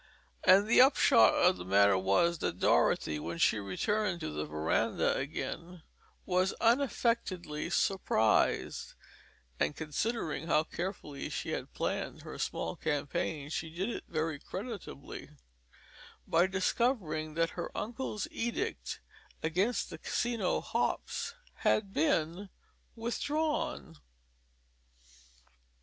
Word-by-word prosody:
And 195 +2 +7
the 230 +3 +6
upshot 260 -2 +6
of 180 +1 +4
the - - -6
matter 100 +2 +5
was 100 - +2
that - - -2
Dorothy, 75 -1 +2
when 85 +2 -5
she 105 - +3
returned 175 - -1
to - - -3
the 75 0 -3
veranda 75 +1 +1
again, 165 +4 -5 0.4
was 185 +1 +1
unaffectedly 230 - +1
surprised 110 - +1 0.6
(and 145 - +1
considering 160 - -2
how 155 -1 +3
carefully 165 -5 -5
she - - -4
had - - -5
planned - - -3
her - - -8
small 80 - -2
campaign 145 0 -2
she 160 0 -3
did 180 +7 -3
it - - -6
very 155 -2 -2
creditably) 200 - -7 1.0
by 170 +3 +4
discovering 190 - 0
that 165 0 +1
her 175 - -4
uncle's 230 -1 -3
edict 235 +1 -3 0.4
against 185 +9 0
the - - -7
Casino 235 -6 0
hops - - -2 0.2
had 200 -2 +1
been 165 +5 +1 0.5
withdrawn. 300 - -2
170 Hz, 110 wpm, -32 LUFS, 150-215 Hz, 1.0 s, And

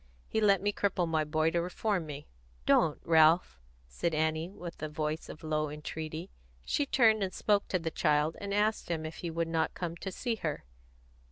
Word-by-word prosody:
He 220 - 0
let 200 -3 +4
me 205 0 +1
cripple 190 -4 0
my 160 -1 +1
boy 155 +1 +1
to 170 - +1
reform 180 0 -1
me." 145 0 -7 0.4
"Don't, 155 -2 +3
Ralph!" 160 - +4 0.3
said 155 - -2
Annie, 160 +2 0
with 175 -3 -9
a 155 - -3
voice 155 +1 -3
of 155 - -10
low 155 -1 0
entreaty. 155 +3 -6 0.3
She 290 - 0
turned 220 -5 +4
and 190 -1 0
spoke 205 -1 +2
to 185 - +1
the 165 -2 -3
child, 150 0 +2
and 200 0 -4
asked 210 0 +1
him 160 -2 -2
if 160 +1 -6
he 170 - -4
would 165 0 -1
not 165 -1 0
come 170 -2 -3
to 190 - -5
see 230 +4 -2
her. 155 -7 -3
165 Hz, 195 wpm, -31 LUFS, 155-195 Hz, 0.4 s, let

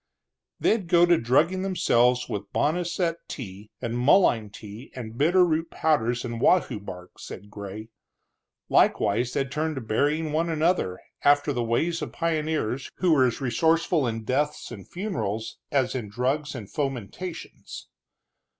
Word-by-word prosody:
They'd 215 -6 +1
go 170 0 +5
to 175 0 +5
drugging 160 +9 +2
themselves 125 -10 +2
with 105 -3 -5
boneset 170 +1 0
tea, 105 -4 -8
and 115 0 -2
mullein 125 - +4
tea, 105 +4 -11
and 115 -3 -7
bitter 175 +7 +4
root 165 0 0
powders 125 -6 0
and 120 -1 -5
wahoo 180 - +3
bark, 90 -3 -10
said 105 +2 -10
Gray. 105 +2 -8 0.8
Likewise, 120 +5 +2
they'd 135 -2 -1
turn 155 +2 -1
to 130 - -4
burying 150 +8 0
one 165 +2 0
another, 160 - +1 0.2
after 145 0 +4
the 120 -2 -1
ways 160 +9 0
of - - -5
pioneers, 155 -6 -1
who 180 -2 +1
were 130 -4 +5
as 120 - -3
resourceful 160 +3 +2
in 115 -1 -3
deaths 145 +6 -1
and 100 -5 -10
funerals 115 - -4
as 130 -3 +1
in 120 -6 -4
drugs 135 +7 -1
and 110 -6 -8
fomentations. 140 - -5
135 Hz, 145 wpm, -26 LUFS, 115-165 Hz, 0.8 s, go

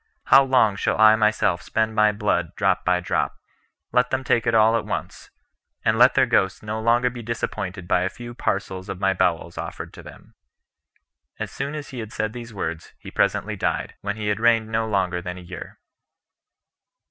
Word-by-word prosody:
How 135 +1 +7
long 125 -7 +3
shall - - 0
I 110 0 +8
myself 105 -5 +1
spend 110 +3 -1
my 105 -1 +4
blood 100 -5 -1
drop - - +1
by 90 0 +2
drop? 90 - -1 0.6
let 125 +1 +2
them 130 0 -1
take 120 -1 +1
it 115 - +2
all 110 +1 +5
at 115 - 0
once; - - -5 0.6
and - - +3
let - - +5
their - - +5
ghosts 95 +1 +1
no 110 +1 -4
longer 120 +2 +3
be 120 0 -8
disappointed 100 -5 -4
by 90 - +2
a 95 - 0
few 120 +4 -9
parcels 95 -5 -3
of 90 - -5
my 95 0 +2
bowels 85 -2 -1
offered - - -6
to - - -11
them." - - -14 1.0
As - - -5
soon 140 +2 -4
as 150 -2 -6
he 130 - -7
had 110 -1 -6
said 110 -1 -2
these 120 -1 -8
words, 85 -5 -5
he - - -11
presently - - 0
died, - - -2
when 100 +1 -3
he 105 -1 -2
had 105 0 0
reigned 115 -1 +3
no 110 0 0
longer 95 -4 0
than 90 +1 -6
a - - -9
year. 90 +1 -9
110 Hz, 195 wpm, -23 LUFS, 95-115 Hz, 1.0 s, I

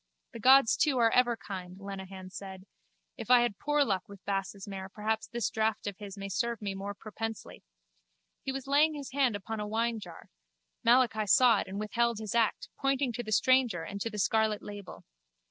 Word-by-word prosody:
The 230 - -8
gods 260 0 +6
too 295 -5 +2
are 230 -2 +4
ever 240 -1 +3
kind, 185 -3 -7
Lenehan 190 -1 -8
said. 190 -1 -9 0.5
If 230 -1 -7
I 250 -1 +7
had 240 -5 -1
poor 295 0 +2
luck 195 -8 -2
with 200 -1 -13
Bass's 195 0 -3
mare 195 -1 -6
perhaps 220 +2 -2
this 235 -6 -2
draught 220 0 0
of 200 -2 -4
his 200 -1 -8
may 195 0 -5
serve 235 +4 -1
me 200 -2 -3
more 200 +1 -5
propensely. 225 +1 -7 0.8
He 270 - -3
was 270 0 -5
laying 295 +3 +3
his 285 -2 -7
hand 265 -5 +2
upon 215 +2 -5
a 210 - -3
winejar: 220 -5 -3 0.5
Malachi 235 -3 +3
saw 235 0 +6
it - - -4
and 195 +2 -5
withheld 235 +2 0
his 215 -1 -5
act, 230 -2 +1
pointing 275 -2 +1
to 240 - -3
the 215 -2 -7
stranger 245 -7 +3
and 200 +4 -6
to 230 - -1
the 210 - -7
scarlet 215 +1 +1
label. 205 -2 -9
220 Hz, 195 wpm, -30 LUFS, 200-240 Hz, 0.8 s, I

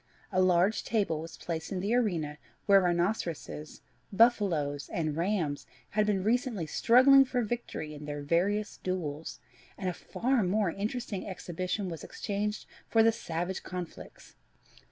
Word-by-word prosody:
A 185 -1 +3
large 185 +3 +3
table 200 -9 0
was 165 +1 -9
placed 165 -2 -4
in 190 - -2
the 200 +5 0
arena 170 -11 0 0.3
where 200 -1 +6
rhinoceros, 175 -4 -2 0.3
buff 230 +3 +5
aloes, 145 -7 -1
and 155 -3 -1
rams 170 -4 -1 0.2
had 210 0 +2
been 195 -3 +1
recently 225 -4 0
struggling 255 - +6
for 250 -2 -1
victory 215 -9 -4
in 150 0 -8
their 145 -1 -5
various 195 +7 0
duels, 165 -5 -4 0.4
and 190 - -3
a 180 - 0
far 250 +7 0
more 195 0 +1
entertaining 210 -1 -3
exhibition 185 +2 -3
was 165 -4 -6
exchanged 210 +1 -3 0.2
for 225 -1 +4
the 225 - +6
savage 175 -3 -3
conflicts.... 180 -2 -8
185 Hz, 145 wpm, -30 LUFS, 165-215 Hz, 0.4 s, where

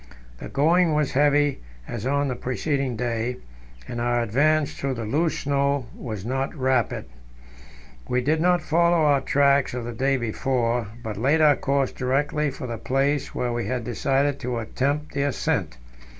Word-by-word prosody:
The - - -7
going 160 +3 +3
was 150 -2 +1
heavy, 145 0 +3 0.3
as 120 +1 -4
on 140 +1 +1
the 130 - -2
preceding 130 +1 -2
day, 120 +1 -2 0.5
and 120 -1 -4
our 120 0 +1
advance 145 +6 +2
through 135 -1 -3
the 115 -2 -4
loose 155 +9 0
snow 140 -1 0
was 110 -6 -6
not 135 +5 -2
rapid. 130 -5 0 1.0
We 125 0 +1
did 155 +5 +1
not 175 -1 +3
follow 170 +1 +3
our 140 -2 +4
tracks 140 -1 +2
of 120 -2 -4
the 120 - -5
day 135 +3 +1
before, 120 -1 -1 0.2
but 110 -4 -5
laid 140 +8 +2
our 150 -2 +6
course 140 -1 0
directly 145 +3 0
for 135 -1 -7
the 115 -3 -5
place 140 +2 0
where 120 -1 -1
we 120 0 -2
had 125 -2 -2
decided 135 +4 0
to 125 0 -3
attempt 140 +6 -2
the 140 - -1
ascent. 140 - -1
135 Hz, 165 wpm, -24 LUFS, 120-145 Hz, 1.0 s, our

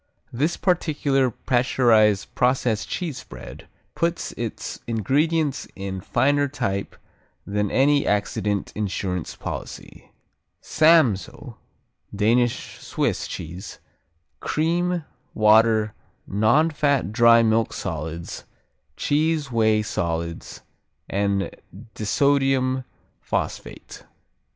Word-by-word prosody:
This 150 +8 0
particular 145 -7 +1
pasteurized 115 -4 +2
process 125 -3 +1
cheese 155 -8 -4
spread - - -11 0.3
puts 170 0 -1
its 115 -2 -5
ingredients 140 - 0
in 95 -1 -5
finer 140 +7 +2
type 100 -8 -3 0.5
than 105 0 -1
any 140 +4 +3
accident 105 -1 -1
insurance 95 -4 -3
policy: - - -8 0.5
Samsoe 155 - +2 0.6
(Danish 120 +4 +1
Swiss) - - -2
cheese, 85 +4 -7 0.6
cream, 170 +1 0 0.3
water, 110 0 +4 0.3
non 110 +11 +2
fat 140 - +1
dry 115 0 +6
milk 110 0 +2
solids, 80 +2 -5 0.5
cheese 150 -1 0
whey 110 -2 +2
solids 85 -4 -4 0.5
and 100 0 -1 0.4
disodium 130 +2 +1 0.3
phosphate. - - -5
115 Hz, 85 wpm, -23 LUFS, 105-145 Hz, 0.6 s, dry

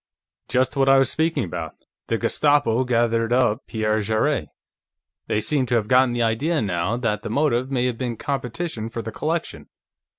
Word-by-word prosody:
"Just 130 +3 +1
what 135 -1 +3
I 135 - +7
was 135 -2 +3
speaking 160 +1 0
about. 85 - -5 0.3
The - - 0
Gestapo 135 -5 +2
gathered 115 -1 +1
up 120 -4 +1
Pierre 110 -1 0
Jarrett; 110 +1 0 0.8
they 105 - +1
seem 130 +3 0
to 120 - +1
have 110 -3 +1
gotten 125 +1 +4
the 120 -1 0
idea, 140 +9 0
now, 95 +1 -1
that 115 -4 -1
the - - -6
motive 130 0 +1
may 125 -2 0
have 125 -2 -2
been 120 -3 -3
competition 130 -2 -4
for 115 0 -5
the 115 - -5
collection. 160 +8 -3
120 Hz, 175 wpm, -23 LUFS, 110-135 Hz, 0.8 s, I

